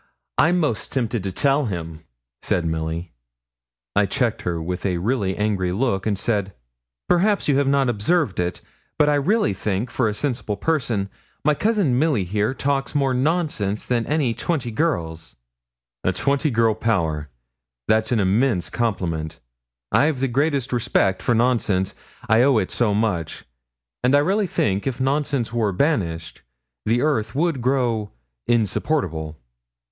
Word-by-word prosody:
I'm 170 Hz, +4 st, +4 dB
'most 135 Hz, -10 st, -1 dB
tempted 120 Hz, -4 st, -1 dB
to 95 Hz, 0 st, -3 dB
tell 140 Hz, +7 st, +2 dB
him,' 85 Hz, -6 st, -5 dB, 0.4 s
said 85 Hz, -, 0 dB
Milly. 80 Hz, +1 st, -3 dB, 0.8 s
I 100 Hz, -1 st, +3 dB
checked 120 Hz, +2 st, 0 dB
her 85 Hz, -2 st, -2 dB
with 90 Hz, +2 st, -4 dB
a 90 Hz, -3 st, 0 dB
really 100 Hz, 0 st, -1 dB
angry 100 Hz, -4 st, 0 dB
look, 100 Hz, -1 st, 0 dB
and 100 Hz, -2 st, 0 dB
said, 100 Hz, -3 st, -1 dB, 0.5 s
'Perhaps 200 Hz, +4 st, +2 dB
you 140 Hz, -2 st, +3 dB
have 140 Hz, -, +1 dB
not 140 Hz, -1 st, +3 dB
observed 120 Hz, -, +1 dB
it; 90 Hz, 0 st, -2 dB, 0.4 s
but 150 Hz, -, +4 dB
I -, -, +3 dB
really 145 Hz, -, +2 dB
think, 100 Hz, +4 st, -2 dB
for 120 Hz, -3 st, +1 dB
a 105 Hz, -, -3 dB
sensible 120 Hz, -6 st, -2 dB
person, 120 Hz, -11 st, 0 dB, 0.4 s
my 150 Hz, -, +5 dB
cousin 190 Hz, -, +1 dB
Milly 145 Hz, -9 st, +2 dB
here 105 Hz, +7 st, -1 dB
talks 140 Hz, +1 st, -1 dB
more 135 Hz, -2 st, +2 dB
nonsense 130 Hz, -, 0 dB
than 120 Hz, -2 st, 0 dB
any 145 Hz, -6 st, +1 dB
twenty 140 Hz, -2 st, -2 dB
other -, -, -11 dB
girls.' 80 Hz, -, -1 dB, 0.7 s
'A 95 Hz, -, +1 dB
twenty 140 Hz, -, +1 dB
girl 115 Hz, -3 st, +3 dB
power! 85 Hz, -10 st, -1 dB, 0.6 s
That's 110 Hz, +1 st, +2 dB
an 120 Hz, -, +2 dB
immense 100 Hz, -, +1 dB
compliment. 85 Hz, -8 st, -2 dB, 0.5 s
I've 150 Hz, -2 st, +3 dB
the 135 Hz, -, +1 dB
greatest 140 Hz, 0 st, 0 dB
respect 115 Hz, -5 st, +1 dB
for 120 Hz, -, +1 dB
nonsense, 110 Hz, -5 st, +1 dB, 0.3 s
I 110 Hz, 0 st, +5 dB
owe 135 Hz, -1 st, +4 dB
it 95 Hz, -4 st, 0 dB
so 110 Hz, -4 st, +1 dB
much; 100 Hz, -7 st, -1 dB, 0.6 s
and 130 Hz, +3 st, +4 dB
I -, -, +6 dB
really 195 Hz, +6 st, +1 dB
think 100 Hz, -, 0 dB
if 130 Hz, -1 st, -2 dB
nonsense 135 Hz, -3 st, 0 dB
were 110 Hz, -4 st, +1 dB
banished, 90 Hz, -, -1 dB, 0.5 s
the 120 Hz, +3 st, +2 dB
earth 115 Hz, -8 st, 0 dB
would 160 Hz, -3 st, 0 dB
grow 120 Hz, -5 st, 0 dB, 0.3 s
insupportable.' 95 Hz, -, 0 dB
115 Hz, 150 wpm, -22 LUFS, 95-140 Hz, 0.8 s, I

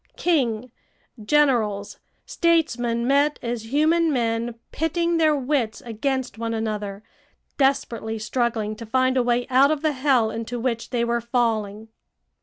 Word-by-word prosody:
King, 255 Hz, -8 st, 0 dB, 0.5 s
generals, 225 Hz, -7 st, +1 dB, 0.3 s
statesmen 245 Hz, -9 st, +1 dB
met 285 Hz, +3 st, +2 dB
as 235 Hz, -1 st, -4 dB
human 320 Hz, +3 st, +3 dB
men 230 Hz, -2 st, -1 dB, 0.2 s
pitting 335 Hz, +2 st, 0 dB
their 310 Hz, -2 st, +3 dB
wits 260 Hz, -5 st, -1 dB
against 245 Hz, +1 st, -3 dB
one 230 Hz, 0 st, -2 dB
another, 210 Hz, -2 st, -4 dB, 0.6 s
desperately 235 Hz, -5 st, 0 dB
struggling 220 Hz, -1 st, -1 dB
to 230 Hz, -, -9 dB
find 255 Hz, +3 st, +2 dB
a 255 Hz, -, +3 dB
way 240 Hz, 0 st, +1 dB
out 265 Hz, +2 st, +5 dB
of 310 Hz, 0 st, -1 dB
the 310 Hz, -, +2 dB
hell 260 Hz, -5 st, +2 dB
into 230 Hz, +2 st, -5 dB
which 235 Hz, -1 st, -2 dB
they 240 Hz, -2 st, 0 dB
were 235 Hz, 0 st, 0 dB
falling. 225 Hz, -3 st, -1 dB
240 Hz, 135 wpm, -23 LUFS, 225-280 Hz, 0.6 s, out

